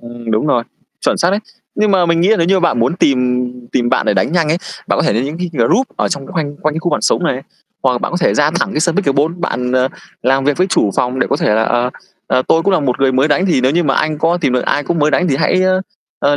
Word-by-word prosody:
Ừm, 120 -1 -8
đúng 110 +6 +1
rồi. 125 -5 +2 0.4
Chuẩn - - +1
xác 170 - +2
đấy. 200 +2 0 0.3
Nhưng 210 0 +1
mà 185 -3 +3
mình 170 0 +2
nghĩ 180 - +3
là 220 - +4
nếu 170 -3 +1
như 190 +1 +2
bạn 175 -8 +1
muốn 125 +9 +1
tìm 125 -5 +1 0.3
tìm 120 -1 +1
bạn 130 - +1
để - - +2
đánh 95 +9 0
nhanh 170 -3 +1
ấy, 165 +3 +1 0.3
bạn - - 0
có - - +2
thể - - +1
đến 115 +5 0
những 150 +4 -5
cái 180 -1 -3
group 145 - +2
ở - - 0
trong 140 -1 -4
khoanh 155 -6 -4
quanh 155 +1 -2
cái - - -2
khu 175 +1 -2
bạn 150 - 0
sống 180 - +1
này. 135 -5 -1 0.4
Hoặc 130 - +3
là 125 - -1
bạn - - -3
có - - -1
thể - - +2
ra 150 0 +3
thẳng 175 +4 -1
cái 155 - -1
sân 170 +1 +1
pickleball, 150 -4 +1
bạn, 125 -7 -2
ờ, 130 0 +2 0.3
làm 135 +2 +2
việc 145 0 +1
với 185 - +2
chủ 110 - +1
phòng 125 +1 0
để - - +1
có 140 - +2
thể 105 - +1
là 110 - +2
"Ờ, 120 +2 0 0.4
ờ, 130 - +1
tôi 165 - +3
cũng 200 - +1
là 185 - +2
một 130 -3 -1
người 135 -1 +3
mới 130 +4 +2
đánh 165 +6 +2
thì 170 -8 +2
nếu 130 +2 +2
như 175 +2 +2
mà 135 -2 +1
anh 155 -1 0
có 170 +3 +1
tìm 135 - +1
được 125 - +1
ai 145 - 0
cũng 170 +4 -1
mới 150 0 +2
đánh 180 +3 +1
thì 135 - +1
hãy, 165 +5 +1 0.6
ơ, 145 0 +2
145 Hz, 305 wpm, -15 LUFS, 125-170 Hz, 0.6 s, là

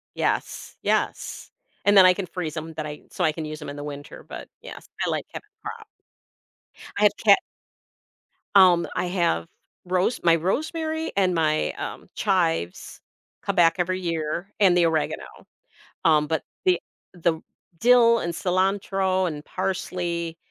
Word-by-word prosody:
Yes, - - -2
yes, - - -1 0.3
and 205 0 +5
then 185 - +9
I 180 - +7
can 195 0 -4
freeze 170 -3 -5
'em 160 +1 -6
that 155 - -4
I 150 0 -8
so - - 0
I 155 - +2
can 160 0 -5
use 155 0 -6
'em 150 - -7
in 140 - -6
the 145 - -6
winter, 145 0 -8
but - - -9
yes, - - -10 0.2
I - - -1
like - - -2
having 425 - -8
crop. 455 -2 -8 1.1
I - - +1
have - - +7
ke - - +7 1.2
Um, 180 -3 +6
I 180 - 0
have 170 - 0 0.4
rose 185 +6 0
my 170 -1 +6
rosemary 315 - -2
and 185 -2 +3
my, 155 -2 +1
um, - - -7
chives 170 - -1 0.4
come 200 - -1
back 170 -2 +5
every 185 +1 0
year, 170 +2 -3
and 185 -3 +5
the 175 - +5
oregano, 160 -2 0 0.8
um, 155 -2 +4
but 160 -1 -1 0.2
the 180 -2 +3 0.3
the 170 -2 0 0.4
dill 235 +2 +6
and 170 - -2
cilantro 190 0 +1
and 150 -2 -6
parsley, 175 -3 -3
175 Hz, 155 wpm, -24 LUFS, 160-190 Hz, 1.2 s, then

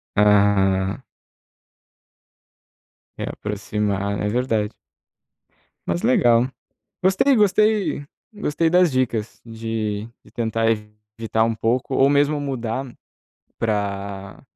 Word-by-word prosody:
Ah. 100 +1 +3 2.1
É, - - -4
aproximar. 100 -1 -2
É 105 - -1
verdade. 110 -2 0 1.1
Mas 85 0 -1
legal. 120 -1 +4 0.6
Gostei, 195 +9 +4
gostei. 210 -5 +2 0.3
Gostei 165 -6 0
das 180 -2 +4
dicas 120 -4 -1
de 110 -2 -3 0.2
de - - -18
tentar 115 -1 -1
evitar 105 +1 -2
um 115 0 0
pouco 120 +4 -1
ou 135 +1 +4
mesmo 145 +1 +2
mudar 130 -2 -3 0.7
pra 100 -2 -3
115 Hz, 90 wpm, -22 LUFS, 105-135 Hz, 2.1 s, legal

